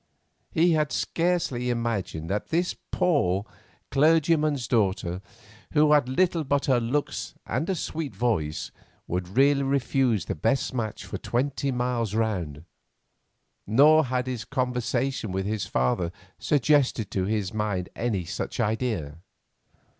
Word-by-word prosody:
He 170 +2 +3
had 155 -3 +1
scarcely 165 -8 0
imagined 115 -9 -2
that 100 +3 -2
this 175 +2 +1 0.2
poor 100 - +1 0.5
clergyman's 155 -3 +3
daughter, 95 -5 0 0.5
who 150 0 +4
had 145 -4 +4
little 170 +3 +2
but 140 0 0
her 130 -3 +3
looks 130 +5 -2
and 165 - -2
a 190 - +1
sweet 155 - -4
voice, 95 -9 -1 0.3
would 90 +4 -4
really 140 +1 +5
refuse 135 -6 +1
the - - -2
best 135 - 0
match 110 -4 -3
for - - -6
twenty 135 +3 -1
miles 125 -4 -1
round, 90 -9 -2 1.0
nor 150 +8 +6
had 125 0 -1
his 125 -4 -4
conversation 125 -2 -1
with 95 +1 -2
her 110 +1 -1
father 85 +2 0 0.3
suggested 140 -6 +2
to 95 -1 0
his 105 -2 -1
mind 105 -4 -1
any 105 -7 -1
such 90 - -5
idea. 110 - -1
120 Hz, 130 wpm, -26 LUFS, 100-140 Hz, 1.0 s, nor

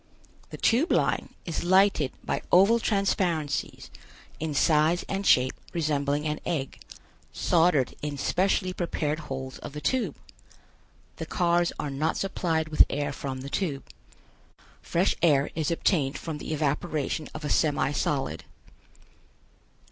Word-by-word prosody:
The - - -8
Tube 255 +9 +2
Line - - 0
is 165 -1 -3
lighted 185 -6 +3
by - - -2
oval 200 +6 +6
transparencies, 180 -8 -1 0.5
in 155 -2 -3
size 155 +4 +3
and 195 0 -2
shape 130 +1 +4 0.2
resembling 150 -2 0
an 150 0 -2
egg, 140 -6 -3 0.5
soldered 165 -6 +2
in 145 -1 -4
specially 185 +4 +1
prepared 155 -4 -2
holes 135 -4 -6
of - - -8
the 150 - -5
Tube. 235 - -1 1.0
The - - -5
cars 175 -1 +2
are 145 - -3
not 150 +4 -1
supplied 165 -5 -1
with 155 - +6
air 145 0 -2
from 135 -2 -5
the 135 - -7
tube. 145 -9 -2 1.0
Fresh 175 +4 +1
air 145 -5 +3
is 155 -2 -1
obtained 160 -4 +1
from 160 -3 -5
the - - -6
evaporation 150 0 -1
of 155 -1 -6
a - - -2
semi 145 -2 +2
solid. 145 -1 -2
155 Hz, 135 wpm, -27 LUFS, 145-175 Hz, 1.0 s, oval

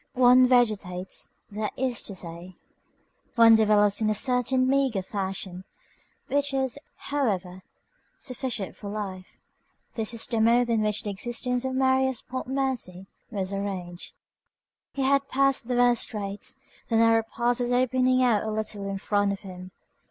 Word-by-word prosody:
One 255 0 +6
vegetates, 210 -7 0 0.2
that 210 0 -3
is 255 -2 -1
to 200 - -7
say, 175 +1 -8 0.8
one 230 -1 +7
develops 210 -1 +4
in 215 - +2
a 215 - +1
certain 255 +2 +2
meagre 265 -7 +1
fashion, 190 -2 -4 0.6
which 285 -1 0
is, 265 0 -1 0.2
however, 195 -10 -2 0.6
sufficient 250 -6 -4
for 200 - -8
life. 195 -3 -6 0.6
This 225 -1 -3
is 225 - 0
the 230 -2 -1
mode 235 +1 +3
in 225 -2 +2
which 210 0 0
the 205 - -3
existence 240 +4 -1
of 260 0 -2
Marius 265 -1 +2
Pontmercy 255 -8 -3 0.2
was 195 -3 -3
arranged: 185 -3 -5 0.8
He 275 - -2
had 275 +1 +2
passed 275 -2 +1
the 250 - -1
worst 245 -1 +4
straits; 205 -1 -4 0.3
the 230 - -1
narrow 225 0 +5
pass 240 +2 -1
was 245 0 -1
opening 255 +1 +2
out 230 -5 +3
a 220 - -3
little 215 -2 -3
in 195 - -3
front 205 0 +1
of 200 - -5
him. 185 -2 -9
225 Hz, 150 wpm, -26 LUFS, 200-255 Hz, 0.8 s, one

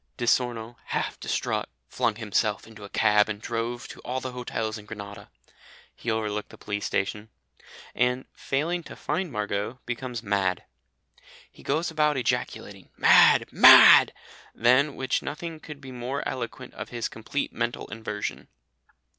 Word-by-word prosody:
"Di - - -2
Sorno, 120 -1 0
half - - -3
distraught, - - -2 0.2
flung 110 - 0
himself 105 -1 -1
into 110 -2 -13
a 100 - -9
cab 105 0 +3
and 105 -1 -4
drove 120 +2 -4
to - - -10
all 130 +1 -3
the 130 0 -5
hotels 115 -3 -4
in 105 - -15
Grenada" 100 -1 -9 0.7
(he 115 - -5
overlooked 105 -2 -2
the - - -14
police 105 0 -4
station), 105 +2 -2 0.6
and, 125 +1 0
failing 165 +6 -2
to - - -11
find 185 -4 -3
Margot, 105 +1 -3
becomes 120 -1 -5
mad. 95 -4 0 0.9
He - - -17
goes 160 +4 -1
about 150 -2 +2
ejaculating 120 -6 -3
"Mad, - - +6
mad!" - - +9 0.4
than 130 +5 +3
which 130 -2 -1
nothing 160 +2 -6
could 150 -2 -10
be 135 -2 -10
more 125 +3 -4
eloquent 125 0 -6
of - - -7
his 120 -1 -3
complete 115 +6 -4
mental 120 +1 -2
inversion. 105 -1 -5
120 Hz, 145 wpm, -26 LUFS, 105-130 Hz, 0.9 s, mad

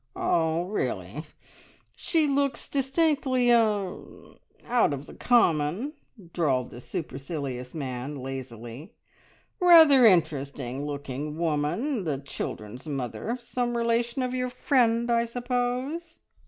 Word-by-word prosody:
"Ah, 165 0 +1
really! 200 +4 -3 0.7
She 325 -3 +1
looks 280 -3 0
distinctly 270 -3 +1
er 210 -5 +2 0.6
out 240 -11 +2
of 140 +1 -6
the - - -12
common," 205 - +2 0.4
drawled 135 -7 0
the 120 - -10
supercilious 140 -5 -5
man 135 -1 -4
lazily. 130 - -8 0.6
"Rather 325 -7 +8
interesting 145 - +2
looking 145 +1 -5
woman, 170 - -1
the 150 -5 -1
children's 125 -2 -6
mother. 140 - -3
Some 240 0 -2
relation 235 +2 0
of 250 0 -2
your 250 0 -1
friend, 235 -2 +2
I 235 0 +3
suppose?" 250 +7 -3
195 Hz, 105 wpm, -27 LUFS, -, 0.7 s, Rather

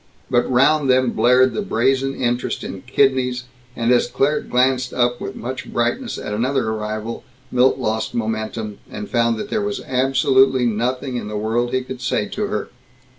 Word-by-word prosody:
But 120 -1 +2
round 140 +3 +3
them 130 -1 +3
blared 125 +1 +4
the - - -2
brazen 135 -8 +1
interest 120 0 -1
in - - -6
kidneys, 130 -2 +2 0.3
and 115 +1 +1
as 120 -1 +4
Claire 140 +4 +1
glanced 125 0 +1
up 120 0 +1
with - - -5
much 130 +2 -6
brightness 120 - -1
at 105 - -5
another 125 +2 0
arrival, 110 +1 -4 0.3
Milt 125 +1 +3
lost 110 -3 -2
momentum, 110 -1 -3
and 105 0 -6
found 115 -1 +2
that - - -6
there 220 - +1
was 205 0 -2
absolutely 130 0 +3
nothing 125 +3 -1
in 120 - -5
the 105 0 -4
world 115 +3 0
he 130 0 0
could 130 0 -8
say - - 0
to 210 0 -2
her. 210 - -3
125 Hz, 175 wpm, -20 LUFS, 115-130 Hz, 0.3 s, blared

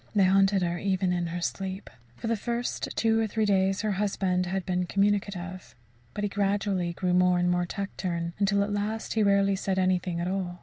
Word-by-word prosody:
They 200 - +5
haunted 195 0 +4
her 175 0 -1
even 190 -2 0
in 175 -1 -1
her 175 +1 -4
sleep. 190 +2 -4 0.3
For - - -9
the 230 0 +1
first 235 +3 -3
two 225 0 +2
or 225 - +1
three 215 +1 0
days 195 -1 +2
her 215 -1 0
husband 190 -2 0
had 190 0 -2
been 180 -1 -1
communicative; 195 -2 -1 0.4
but 205 - -3
he - - +2
gradually 195 -3 0
grew 180 +1 -1
more 180 0 +4
and 175 0 +2
more 175 0 0
taciturn, 175 -4 -3
until 200 0 +2
at 205 0 -3
last 210 +2 -2
he 220 - +1
rarely 200 -1 +3
said 190 0 -2
anything 185 -2 +1
at 170 - -2
all. 180 -2 -3
195 Hz, 205 wpm, -27 LUFS, 180-205 Hz, 0.4 s, They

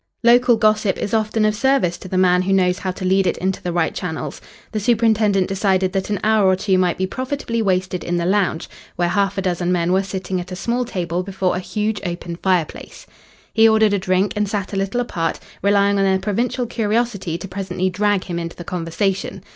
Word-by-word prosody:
Local 240 0 +5
gossip 215 -2 +2
is 205 - -4
often 215 0 +1
of 215 - +2
service 245 -6 +1
to - - -9
the 185 - -2
man 180 -1 +4
who 190 +1 0
knows 180 -1 +2
how 190 - -3
to 185 +1 -4
lead 190 0 +3
it - - 0
into 190 +2 -2
the 175 - -3
right 170 -1 0
channels. 170 -3 -5 0.3
The 215 - -2
superintendent 215 -3 +2
decided 190 -1 +1
that 195 0 -2
an 205 -2 -1
hour 215 -2 +3
or 190 - +4
two 190 0 0
might 180 -2 +1
be 190 - 0
profitably 255 +1 -3
wasted 185 -2 0
in 175 0 -1
the 170 - -1
lounge, 185 -3 0 0.3
where 175 0 0
half 200 +2 0
a 195 - -1
dozen 180 -1 -1
men 175 0 +1
were 190 - +3
sitting 190 -1 -4
at 180 - -10
a - - -4
small 240 +6 -1
table 180 -5 -2
before 190 -1 -1
a - - -1
huge, 210 +2 -2
open 175 -2 -5
fireplace. 180 -4 -2 0.5
He 225 0 +6
ordered 220 -1 +4
a 200 - +1
drink 185 +2 +1
and 210 -1 0
sat 205 -1 -3
a - - -2
little 195 +5 -1
apart, 165 -8 -2 0.2
relying 200 0 +3
on - - +3
their 190 0 +3
provincial 230 +6 -1
curiosity 220 -6 -1
to 185 - -7
presently 185 -1 -2
drag 205 0 +1
him 175 -2 -4
into 170 0 -5
the 175 - -8
conversation. 180 +3 -2
195 Hz, 220 wpm, -20 LUFS, 180-210 Hz, 0.5 s, He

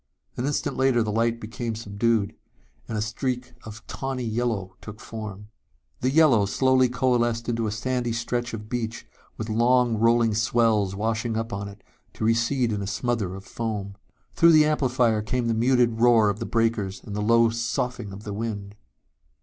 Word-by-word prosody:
An 125 - -2
instant 145 - -2
later 130 -3 +3
the 105 - -2
light 115 +2 +1
became 115 +1 -5
subdued 110 0 0 0.5
and 110 - -3
a 105 - 0
streak 125 +3 -3
of 110 +1 -10
tawny 135 -2 -4
yellow 110 -5 -2
took 105 0 -10
form. 105 -2 -8 0.5
The 130 - +1
yellow 135 -8 +4
slowly 130 +3 +3
coalesced 120 -2 0
into 115 -2 -1
a - - -2
sandy 120 +2 -2
stretch 120 +1 -2
of 105 -1 -9
beach 115 -1 -4 0.3
with 110 - -4
long 120 +1 +3
rolling 115 0 +3
swells 110 -3 +2
washing 110 +2 -1
up 115 +1 -3
on 100 0 -4
it, 100 0 -12 0.3
to - - -3
recede 115 +2 +1
in 105 -1 -2
a 100 - -4
smother 105 -2 -2
of 95 0 -10
foam. 105 -4 -4 0.4
Through 170 0 +6
the 155 -1 +6
amplifier 125 -7 +2
came 120 +3 -1
the 115 - +1
muted 120 0 +2
roar 115 -4 +5
of 100 - -7
the - - -4
breakers 115 -4 0
and 100 - -7
the 105 - -2
low 115 +1 +4
soughing 115 -1 -3
of 100 +2 -9
the 105 - -5
wind. 100 -2 -4
115 Hz, 175 wpm, -25 LUFS, 105-120 Hz, 0.5 s, Through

